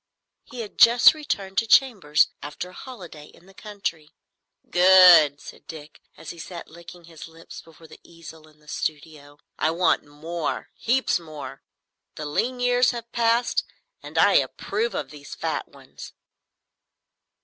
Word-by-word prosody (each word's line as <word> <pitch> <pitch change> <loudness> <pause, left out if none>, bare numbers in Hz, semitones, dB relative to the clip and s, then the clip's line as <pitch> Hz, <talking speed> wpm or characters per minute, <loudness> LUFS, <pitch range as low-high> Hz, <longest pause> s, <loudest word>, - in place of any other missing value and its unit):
He 245 - -8
had 210 - -10
just 235 +4 +7
returned 200 -11 -3
to 225 - -3
chambers 205 - +3
after 150 +5 -7
a - - -16
holiday 180 - -11
in 175 - -21
the 195 - -19
country. 195 -7 -6 0.6
"Good," 180 -5 +6
said - - -14
Dick, 150 -2 -12 0.2
as - - -9
he 170 - -13
sat 170 +1 -9
licking 170 +1 -14
his 165 -2 -12
lips 165 0 -13
before 165 0 -19
the - - -15
easel 160 -2 -14
in 155 -1 -23
the 150 0 -27
studio. 150 -1 -6 0.2
"I 155 - +1
want 170 +1 +1
more,—heaps 170 - -3
more. 155 - -10 0.5
The 155 - -7
lean 245 +12 -2
years 245 0 +2
have 235 -1 -6
passed, 235 +1 +1 0.4
and - - -10
I - - +5
approve 230 +2 -2
of 135 -2 -5
these 145 -1 -11
fat - - -4
ones." - - -14
170 Hz, 150 wpm, -23 LUFS, 155-225 Hz, 0.6 s, just